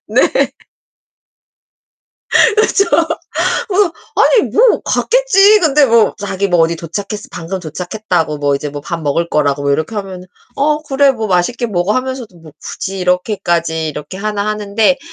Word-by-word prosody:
네. - - +2 2.3
그쵸. 425 -2 +3 0.9
뭐 380 -3 +2 0.2
아니 460 - +4
뭐 475 +1 +3
갔겠지. 430 -4 +4
근데 300 -3 +4
뭐 230 -2 +3
자기 200 -1 -2
뭐 175 -2 +2
'어디 165 +1 +2
도착했어 200 +6 -6
방금 180 +2 -5
도착했다,'고, 175 -1 -3
뭐 145 -1 +1
'이제 145 +2 -3
뭐 145 - -7
밥 170 +3 -4
먹을 165 +4 -1
거.'라고. 145 -1 0
뭐 140 - 0
이렇게 155 +9 -2
하면 190 -3 -6 0.3
'어, 300 +2 +1
그래. 280 -1 +3
뭐 225 -4 -4
맛있게 190 +7 0
먹어.' 190 -1 0
하면서도 255 -6 -4
뭐 155 -3 -15
굳이 195 0 -5
이렇게까지 175 -3 -1
이렇게 150 +5 -7
하나 210 0 -2
하는데 215 +4 +1
200 Hz, 295 characters per minute, -15 LUFS, 165-255 Hz, 2.3 s, 아니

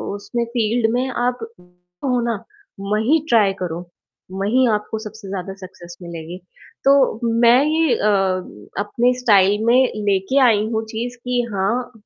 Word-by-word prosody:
उसमें 235 +3 -3
फ़ील्ड 230 -1 0
में 255 +2 0
आप 245 0 -1 0.7
हो 250 -2 +1
ना, 235 - 0 0.5
वहीं 215 +10 +1
ट्राई 210 -4 +4
करो, 170 -1 -3 0.5
वहीं 215 +7 +1
आपको 210 +1 -3
सबसे 215 -2 -10
ज़्यादा 190 0 -5
सक्सेस 175 -2 -12
मिलेगी। 170 0 -8 0.5
तो 275 - +7 0.5
मैं 240 +3 +6
ये 315 -3 +2
अ, 210 - +1 0.7
अपने 240 +4 +1
स्टाइल 205 -3 +3
में 235 - +4 0.3
लेके 195 +8 +2
आई 210 -3 +3
हूँ 220 0 -1
चीज़, 240 +3 -5
कि 245 0 -1
हाँ, 230 +7 -1
220 Hz, 140 wpm, -20 LUFS, 195-245 Hz, 0.7 s, तो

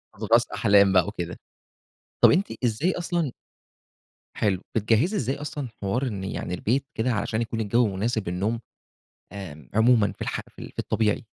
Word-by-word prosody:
أضغاث - - +3
أحلام 100 -1 +5
بقى 90 -1 +4
وكده. 90 -4 -5 0.8
طب - - +8
أنتِ 195 +3 +2
إزاي 130 +11 +1
أصلًا 170 -5 -1 1.0
حلو. 95 -4 +1
بتجهّزي 115 - +2
إزاي 135 +1 0
أصلًا 145 -2 -5
حوار 120 +7 0
إن 100 -5 -4
يعني 95 -2 -4
البيت 125 +9 0
كده، 120 +3 +1
علشان 110 +2 -1
يكون 115 0 -3
الجو 115 +3 +3
مناسب 110 -1 -1
للنوم، 100 +6 -1 0.7
آمم 80 -9 -9
عمومًا 110 0 +4
في - - -16
الح - - -2
في - - -17
ال - - -8
في - - -10
الطبيعي؟ 110 0 0
110 Hz, 160 wpm, -25 LUFS, 100-125 Hz, 1.0 s, طب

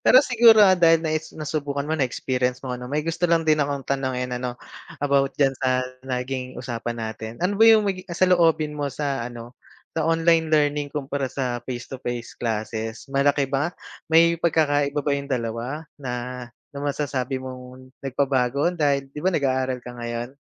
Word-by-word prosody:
Pero 260 +3 +6
siguro 230 -4 +7
dahil 165 -2 +4
naes 155 0 -2
nasubukan 145 -2 -3
mo, 155 - -3
na-experience 125 -3 -1
mo 125 - -3
'no, 125 - -7
may 150 +3 -1
gusto 165 +1 0
lang 165 -1 +3
din 155 -1 +3
akong 140 -1 -1
tanungin 130 -2 -2
ano, 125 0 -3 0.5
about 140 -1 +2
diyan 135 -2 +3
sa 130 -1 0 0.2
naging 130 0 -3
usapan 120 -1 -4
natin. 110 0 -5
Ano 200 +3 0
ba - - +9
yung 220 -1 +6
magi 195 -2 -1
ah, 170 - -5
saloobin 165 -5 +3
mo 145 -1 -2
sa 140 -1 -2
ano, 120 0 -10 0.4
sa 160 -1 -1
online 165 0 +3
learning 145 -1 +2
kumpara 140 -2 -3
sa 125 -2 -3
face 120 -2 -4
to 135 - -9
face 120 -2 -4
classes? 110 0 -4
Malaki 140 +1 +3
ba 140 +4 +1 0.4
may 165 +1 +4
pagkakaiba 145 -3 +2
ba 145 - +1
yung 140 0 -2
dalawa 125 +4 -3 0.2
na 125 -3 -4 0.6
na 140 - -8
masasabi 140 -2 -2
mong 130 0 -9
nagpabago 135 +2 +1
dahil 140 -5 0
'di - - -8
ba 185 - +2
nag-aaral 130 -6 0
ka 125 - -7
ngayon? 120 0 -5
140 Hz, 170 wpm, -24 LUFS, 125-155 Hz, 0.6 s, ba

